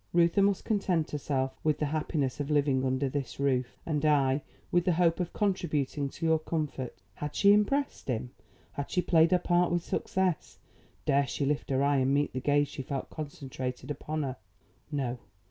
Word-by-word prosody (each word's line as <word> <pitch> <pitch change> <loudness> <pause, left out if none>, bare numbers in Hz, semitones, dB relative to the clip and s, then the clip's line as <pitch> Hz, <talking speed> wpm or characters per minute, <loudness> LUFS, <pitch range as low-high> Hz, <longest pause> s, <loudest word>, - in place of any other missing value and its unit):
Reuther 170 +3 +4
must 200 -1 +2
content 185 -7 0
herself 135 -2 -2
with 155 -1 +2
the 150 - 0
happiness 150 -2 -1
of 145 0 -2
living 140 -3 +2
under 130 +1 +1
this 135 -2 -4
roof; 130 -3 0
and 150 -2 -1
I, 140 -2 +3 0.3
with 175 0 +3
the 180 - +3
hope 165 0 +2
of 175 -1 -2
contributing 150 -8 -1
to 165 - -5
your 160 -1 +4
comfort." 150 -5 -3 0.2
Had 150 0 -5
she 200 0 +6
impressed 275 +8 +1
him? 125 -1 -2 0.4
Had 140 - -5
she 180 - +1
played 165 -1 +5
her 180 - +4
part 175 0 +2
with 175 -1 +1
success? 185 -2 -1 0.5
Dare 140 0 +3
she 140 - -2
lift 145 +1 -1
her 135 0 +2
eye 140 0 +3
and 135 +1 +2
meet 145 +1 +1
the 130 - -2
gaze 145 +2 +2
she - - -6
felt 135 0 -4
concentrated 135 -3 -5
upon 155 +1 -3
her? 130 -2 -4 0.5
No. 130 -4 -2
145 Hz, 185 wpm, -29 LUFS, 135-170 Hz, 0.5 s, she